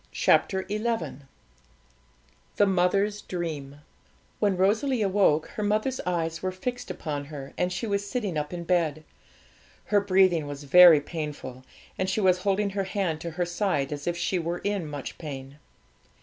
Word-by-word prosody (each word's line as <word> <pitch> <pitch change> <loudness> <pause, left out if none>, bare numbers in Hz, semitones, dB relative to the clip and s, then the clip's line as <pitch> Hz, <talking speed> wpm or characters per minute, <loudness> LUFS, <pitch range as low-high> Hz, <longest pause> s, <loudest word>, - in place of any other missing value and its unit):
CHAPTER 190 -1 +2
XI 210 +1 -2 1.7
THE 205 - +4
MOTHER'S 195 +2 +1
DREAM 150 -5 -5 0.6
When 200 -3 +2
Rosalie 220 +6 +2
awoke, 190 -6 +2
her - - -6
mother's 215 +5 0
eyes 165 -2 -1
were 185 - -1
fixed 245 +6 -5
upon 150 -5 -4
her, 140 -2 -9
and 180 0 0
she 180 +6 -3
was 200 -2 -1
sitting 205 -4 -3
up 150 -1 -2
in 175 -1 -5
bed. 165 -4 0 0.8
Her 205 -1 +3
breathing 185 -5 +3
was 145 0 -7
very 170 +1 +8
painful, 145 -5 -6 0.4
and 185 0 0
she 190 - 0
was 185 -3 +3
holding 200 +1 0
her 195 0 -2
hand 185 -5 -2
to 170 - -4
her 175 - +1
side, 175 -6 -1
as 145 +2 -7
if 175 0 0
she 180 +1 0
were 170 +1 -2
in 200 -5 -1
much 145 -2 -7
pain. 140 -2 -8
180 Hz, 160 wpm, -27 LUFS, 155-200 Hz, 1.7 s, very